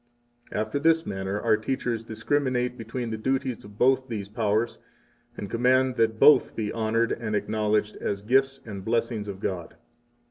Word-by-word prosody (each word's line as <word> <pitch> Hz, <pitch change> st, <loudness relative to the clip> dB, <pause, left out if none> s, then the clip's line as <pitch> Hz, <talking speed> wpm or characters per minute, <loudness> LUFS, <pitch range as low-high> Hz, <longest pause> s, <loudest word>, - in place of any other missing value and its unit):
18 -, -, -6 dB
After 110 Hz, +6 st, -1 dB
this 165 Hz, +2 st, +3 dB
manner 95 Hz, +1 st, -3 dB
our 115 Hz, -2 st, +4 dB
teachers 115 Hz, 0 st, -2 dB
discriminate 125 Hz, +2 st, -1 dB
between 125 Hz, -2 st, -5 dB
the 110 Hz, -, -4 dB
duties 130 Hz, 0 st, -1 dB
of 105 Hz, 0 st, -14 dB
both 130 Hz, +2 st, +3 dB
these 105 Hz, -5 st, -5 dB
powers, 110 Hz, +1 st, 0 dB, 0.6 s
and 100 Hz, -, -5 dB
command 130 Hz, +3 st, +2 dB
that 110 Hz, -1 st, +2 dB
both 150 Hz, -, +6 dB
be 105 Hz, -2 st, -2 dB
honored 115 Hz, +1 st, 0 dB
and 110 Hz, -2 st, -2 dB
acknowledged 105 Hz, 0 st, 0 dB
as 100 Hz, 0 st, -3 dB
gifts 135 Hz, +4 st, +2 dB
and 100 Hz, -4 st, -7 dB
blessings 115 Hz, -1 st, -1 dB
of 100 Hz, -1 st, -6 dB
God. 90 Hz, -4 st, -4 dB
115 Hz, 165 wpm, -26 LUFS, 105-125 Hz, 0.6 s, both